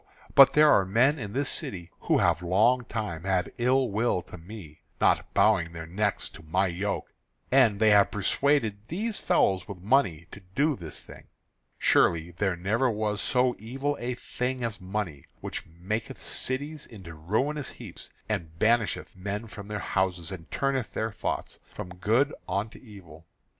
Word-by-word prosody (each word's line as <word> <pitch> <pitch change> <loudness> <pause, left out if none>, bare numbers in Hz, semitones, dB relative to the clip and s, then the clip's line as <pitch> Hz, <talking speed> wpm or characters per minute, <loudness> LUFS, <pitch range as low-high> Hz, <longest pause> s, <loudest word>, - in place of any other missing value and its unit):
But 135 - +8
there 150 0 +6
are 95 - +5
men 120 +10 +3
in 105 -3 -6
this 140 +1 0
city 85 -3 -4
who - - +2
have 80 - +2
long 110 +8 +3
time 90 -9 -4
had 95 -1 0
ill 130 +2 +3
will 105 -3 0
to - - -11
me, 85 -4 -11 0.2
not - - +2
bowing 85 0 +3
their 80 -1 -6
necks 100 +4 -1
to - - -13
my 90 +5 +1
yoke; 95 +3 -3 0.4
and 120 -6 +5
they 110 -1 +5
have 100 -1 +6
persuaded 110 +1 +1
these 210 +6 -2
fellows 95 -2 +2
with 100 - -7
money 95 - +1
to - - -10 0.2
do 150 +1 +2
this 85 -8 -8
thing. - - -14 0.5
Surely 85 0 +3
there 95 +1 -1
never 110 +9 +1
was 105 -2 -1
so 125 -1 +2
evil 135 +7 -2
a 120 +1 -3
thing 125 +1 -3
as 115 -3 -3
money, 95 -6 -4
which - - -6
maketh 105 +10 -4
cities 145 +4 -3
into 95 -7 -10
ruinous 125 - -1
heaps, - - -10 0.2
and 80 -1 -3
banisheth 110 0 +1
men 100 +4 -4
from 105 -3 -10
their 105 0 -3
houses, 95 -4 -1
and 80 -5 -8
turneth 135 -3 -1
their 110 0 -1
thoughts 100 - -4
from - - -7
good 115 +10 +2 0.2
unto 100 +5 -2
evil. 85 -9 -14
105 Hz, 165 wpm, -27 LUFS, 90-125 Hz, 0.5 s, But